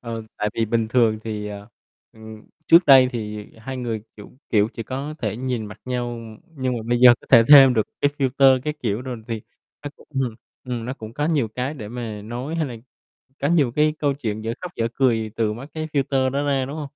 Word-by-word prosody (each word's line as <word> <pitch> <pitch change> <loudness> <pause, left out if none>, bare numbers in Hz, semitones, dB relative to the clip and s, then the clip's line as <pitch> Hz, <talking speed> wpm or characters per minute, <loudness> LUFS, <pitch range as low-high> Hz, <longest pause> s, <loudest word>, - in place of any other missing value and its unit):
ờ, 115 -2 -5
tại 105 - -1
vì 115 - +1
bình 110 0 0
thường 110 -2 +2
thì, 105 -2 -4
ờ, 100 0 -9 0.4
ừm, 110 -1 -12 0.2
trước 170 +2 +6
đây 130 -2 +8
thì 105 -3 -5
2 130 +4 -6
người, 115 -4 -4
kiểu 105 - -12 0.2
kiểu, 105 -1 +3
chỉ 115 - -5
có 135 +6 -5
thể 110 -5 -3
nhìn 125 -3 -3
mặt 105 0 -11
nhau, 120 -1 -3 0.4
nhưng 130 -2 -1
mà 115 - -5
bây 120 0 +1
giờ 125 -1 +9
có - - -19
thể 115 -3 +8
thêm 135 -3 +9
được 110 -2 +1
cái 145 - +3
filter 135 -1 +4
các 150 0 -2
kiểu 110 0 -2
rồi 125 -3 -6
thì 115 -2 -4 0.4
nó 145 - -4
cũng, - - -19
ừm 130 -4 -1 0.3
ừm, 120 -2 -4
nó 125 - -3
cũng 110 -3 -10
có 145 +5 -1
nhiều 150 -8 +1
cái 125 +6 -4
để 110 -8 -8
mà 115 -3 -6
nói, 120 +8 -5
hay 165 -2 -1
là 125 -3 -7 0.7
có 140 - +1
nhiều 150 -6 +3
cái 150 +4 +2
câu 145 -2 +1
chuyện 110 -6 -4
dở 115 +1 -2
khóc, 180 - -6
dở 115 - 0
cười 115 -5 +1
từ 110 -2 0
mấy 125 +6 -9
cái 155 0 -4
filter 135 -2 +1
đó 140 +2 -1
ra, 135 -2 0
đúng 140 +3 -7
hông? 155 - -4
125 Hz, 235 wpm, -22 LUFS, 110-135 Hz, 0.7 s, giờ